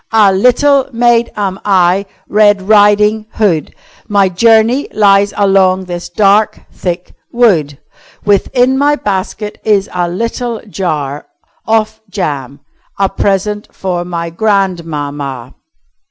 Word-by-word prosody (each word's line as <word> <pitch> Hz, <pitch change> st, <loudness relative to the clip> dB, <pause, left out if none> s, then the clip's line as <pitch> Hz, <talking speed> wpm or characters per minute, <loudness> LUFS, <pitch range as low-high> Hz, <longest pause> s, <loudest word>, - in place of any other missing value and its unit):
"A 210 Hz, -3 st, +4 dB
little 255 Hz, +6 st, +3 dB
maid 235 Hz, 0 st, +2 dB
am 195 Hz, -2 st, -3 dB
I 190 Hz, 0 st, +2 dB, 0.2 s
Red 205 Hz, -2 st, +3 dB
Riding 210 Hz, +1 st, +3 dB
Hood. 185 Hz, -8 st, 0 dB, 0.3 s
My 200 Hz, -2 st, +2 dB
journey 225 Hz, +7 st, +3 dB
lies 200 Hz, -1 st, +3 dB
along 190 Hz, -2 st, +2 dB
this 175 Hz, -1 st, -6 dB
dark, 210 Hz, +1 st, +2 dB
thick 175 Hz, 0 st, -5 dB, 0.2 s
wood. 175 Hz, -, +2 dB, 0.5 s
Within 245 Hz, +6 st, +2 dB
my 290 Hz, +1 st, +3 dB
basket 210 Hz, -2 st, -4 dB
is 205 Hz, -2 st, +1 dB
a 175 Hz, -1 st, -1 dB
little 230 Hz, +4 st, -3 dB
jar 150 Hz, -8 st, -4 dB, 0.4 s
Of 220 Hz, 0 st, 0 dB
jam 145 Hz, -, -4 dB, 0.4 s
a 195 Hz, -1 st, +1 dB
present 205 Hz, +2 st, -1 dB
for 180 Hz, -2 st, -3 dB
my 170 Hz, -1 st, -5 dB
grand 195 Hz, -2 st, 0 dB
mamma." 145 Hz, -5 st, -6 dB
200 Hz, 115 wpm, -13 LUFS, 180-220 Hz, 0.5 s, A